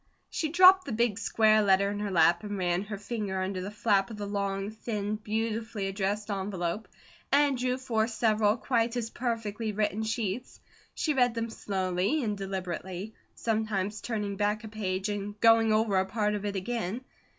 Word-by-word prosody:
She 315 - -1
dropped 370 +3 +7
the 275 - -5
big 225 -2 +1
square 215 -1 +4
letter 200 0 +3
in 205 - -4
her 205 -1 -2
lap 175 -1 +4
and 205 -1 -4
ran 180 +1 0
her 210 0 -5
finger 205 -2 -3
under 185 0 -2
the 190 - -4
flap 205 -2 +1
of 220 - -7
the 205 - -4
long, 200 0 -2
thin, 215 -2 -3
beautifully 220 -1 -2
addressed 200 +2 -2
envelope, 190 0 -3 0.4
and 285 -1 +4
drew 250 0 0
forth 230 -4 0
several 215 -1 +2
quite 235 -1 0
as 230 -2 -3
perfectly 225 -3 -2
written 210 0 0
sheets. 220 +1 -3 0.4
She 305 - 0
read 245 -3 +2
them 230 0 -2
slowly 195 - -1
and 210 -3 -1
deliberately, 190 +1 -5 0.2
sometimes 215 -2 -1
turning 210 -4 -3
back 210 +2 0
a 220 - -7
page 195 -2 -2
and 205 0 -4
going 225 0 +5
over 215 -2 +2
a 190 - +1
part 210 +1 0
of 210 -1 -3
it 205 -1 -2
again. 220 +2 -2
210 Hz, 175 wpm, -29 LUFS, 195-225 Hz, 0.4 s, dropped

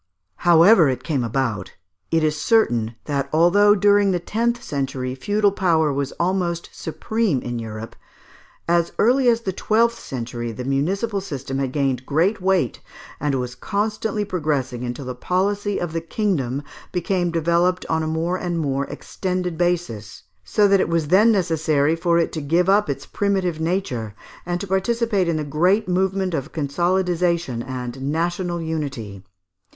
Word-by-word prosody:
However 175 0 +6
it 130 -1 -3
came 140 -6 -1
about, 115 -4 -2 0.4
it 165 -1 +2
is 155 -1 +2
certain 120 - +2
that 140 -2 -2
although 200 +6 +5
during 205 0 +4
the 180 -2 +1
tenth 235 +6 -1
century 135 -2 -3
feudal 205 +10 +1
power 165 -6 +2
was 140 0 -2
almost 175 -1 -1
supreme 205 - -1
in 120 -1 -3
Europe, 110 0 -7 0.7
as 170 0 +2
early 250 +3 +3
as 230 -1 +2
the 190 -4 -3
twelfth 230 +4 +1
century 120 -2 -5
the 120 +3 -6
municipal 195 - -1
system 135 -7 -5
had 135 -2 -1
gained 135 -3 -1
great 175 +8 +1
weight, 185 - +1 0.4
and 145 -1 0
was 125 -1 -3
constantly 210 - -2
progressing 145 -9 -2
until 125 +2 -5
the 125 - -4
policy 200 +8 -1
of 175 -2 -4
the 165 - -1
kingdom 160 - -1 0.3
became 180 0 0
developed 170 +2 +1
on 160 0 0
a 155 - -2
more 165 +3 -1
and 175 -2 -2
more 140 -3 -1
extended 180 -2 -3
basis, 165 - -2 0.2
so 205 - +3
that 195 0 +4
it - - +1
was 165 -3 0
then 210 +6 +6
necessary 160 -5 +1
for 170 0 +1
it 170 - +1
to 160 - -4
give 170 +5 +1
up 205 +2 +3
its - - -3
primitive 190 -5 -1
nature, 135 - -2 0.3
and 175 0 -1
to - - -3
participate 200 0 0
in 165 -2 0
the 155 - -2
great 180 +9 +2
movement 190 0 0
of 145 -1 -3
consolidisation 170 -2 0
and 125 0 -6
national 170 +5 -1
unity. 135 - -4
170 Hz, 155 wpm, -22 LUFS, 140-190 Hz, 0.7 s, However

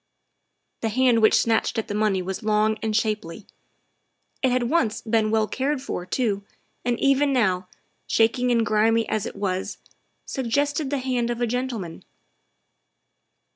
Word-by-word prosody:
' - - -52
' - - -52
The 225 - 0
hand 245 0 +3
which 215 - +5
snatched 225 0 +1
at 225 - -2
the - - -4
money 205 -3 +1
was 190 +1 -4
long 215 0 +2
and 220 -1 -1
shapely; 215 -4 -2 1.0
it 260 - +3
had 250 0 +1
once 240 -4 +1
been 220 -1 +1
well 220 0 +2
cared 270 +6 -1
for 180 -9 -5
too, 205 -2 -1 0.4
and 240 -1 -1
even 275 +1 +3
now, 190 -8 +1 0.4
shaking 235 +2 +2
and 230 -2 +2
grimy 220 +1 +2
as 215 0 -1
it - - -8
was, 190 -2 -3 0.5
suggested 285 +3 -1
the 285 - -1
hand 250 -2 -1
of 240 0 -2
a 240 - +1
gentleman. 235 -8 -4
225 Hz, 160 wpm, -24 LUFS, 210-255 Hz, 1.0 s, which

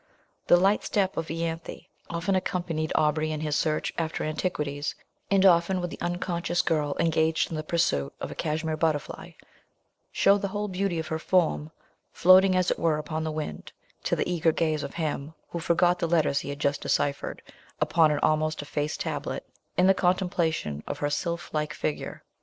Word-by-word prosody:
The 175 - +7
light 195 +3 +3
step 195 -2 0
of 165 0 -3
Ianthe 165 0 -4 0.2
often 170 +3 -1
accompanied 175 -4 -1
Aubrey 155 +1 +2
in 155 -1 -3
his 150 -1 -1
search 155 0 0
after 160 -1 -2
antiquities, 150 -3 -2 0.3
and 195 -1 +4
often 180 +1 +4
would 175 -2 -3
the - - -9
unconscious 175 0 -1
girl, 150 -3 0
engaged 160 0 +2
in - - -3
the 155 - -2
pursuit 155 - 0
of - - -5
a - - -4
Kashmere 160 0 -2
butterfly, 155 -2 -2 0.8
show 200 +1 +4
the 200 - -2
whole 205 +2 -3
beauty 190 -2 -1
of 160 -1 -4
her 160 - -2
form, 165 -3 +1 0.4
floating 185 +1 +6
as 185 -1 +2
it - - -1
were 160 -2 +2
upon 155 +1 -3
the 160 - -2
wind, 155 0 -5 0.3
to - - +2
the - - -1
eager 170 -2 +2
gaze 155 -1 0
of - - -6
him, 155 -1 -3 0.2
who 170 - -3
forgot 175 +2 +2
the 170 - 0
letters 155 -4 +2
he - - -6
had 140 - -4
just 145 0 0
decyphered 140 0 -1 0.4
upon 165 -2 +4
an 150 - +1
almost 155 -1 +1
effaced 145 +1 -3
tablet, - - -3 0.3
in 180 - +5
the 195 - +6
contemplation 175 - 0
of - - -3
her 145 0 -1
sylph 170 +2 -3
like 155 0 -1
figure. 150 - -4
160 Hz, 180 wpm, -27 LUFS, 155-175 Hz, 0.8 s, The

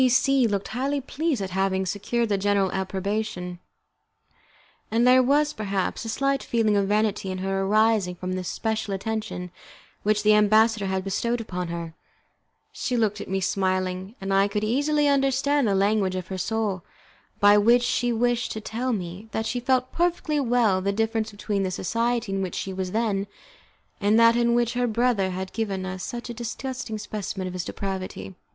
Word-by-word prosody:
C 255 - +5
C 260 0 +3
looked 200 -2 -2
highly 270 +5 -1
pleased 275 -3 -2
at 190 - -5
having 190 0 0
secured 230 +4 -1
the 205 - +2
general 200 -1 +2
approbation, 190 -1 -3 1.3
and 230 +2 +2
there 255 +1 +7
was, 290 +3 +2
perhaps, 200 -3 -2
a 225 - -5
slight 275 +3 0
feeling 225 -3 +1
of 200 -1 +2
vanity 210 -1 0
in 185 - -3
her 195 +1 -1
arising 210 -2 +2
from 185 +1 -4
the 185 0 -3
special 215 +2 -2
attention 215 -3 -4 0.5
which 210 0 +1
the 215 0 +6
ambassador 215 0 +4
had 190 0 -1
bestowed 230 +4 -1
on 180 -1 -2
her. 170 -1 -5 0.8
She 250 - -2
looked 215 -3 0
at - - -7
me, 190 0 -1
smiling, 185 +1 -1
and 195 0 -2
I 195 +1 +4
could 205 +1 -2
easily 290 +6 +2
understand 275 -1 +2
the 200 - +2
language 195 -1 +2
of 185 -1 -5
her 190 - -4
soul, 210 -4 -1 0.6
by 205 0 +6
which 240 +4 +5
she 245 0 +1
wished 240 +1 0
to 220 - -4
tell 235 +4 -3
me 185 +1 -5
that 220 - -1
she 245 - -1
felt 255 +1 +1
perfectly 340 -3 0
well 235 -7 +2
the 200 +1 0
difference 225 +1 -1
between 205 -1 -2
the 190 - 0
society 230 +4 -1
in 195 0 -1
which 185 -3 -3
she 190 - -3
was 185 -1 -3
then, 210 -3 0 0.7
and 210 +2 +3
that 230 0 +6
in 235 0 +3
which 240 0 +1
her 245 0 +1
brother 230 -4 +1
had 185 +1 -5
given 200 -4 -2
us 185 -1 -5
such 240 -1 -5
a 240 - -5
disgusting 240 0 -5
specimen 205 -2 -5
of 180 - -5
his 180 -1 -3
depravity. 185 - -5
215 Hz, 185 wpm, -25 LUFS, 190-240 Hz, 1.3 s, there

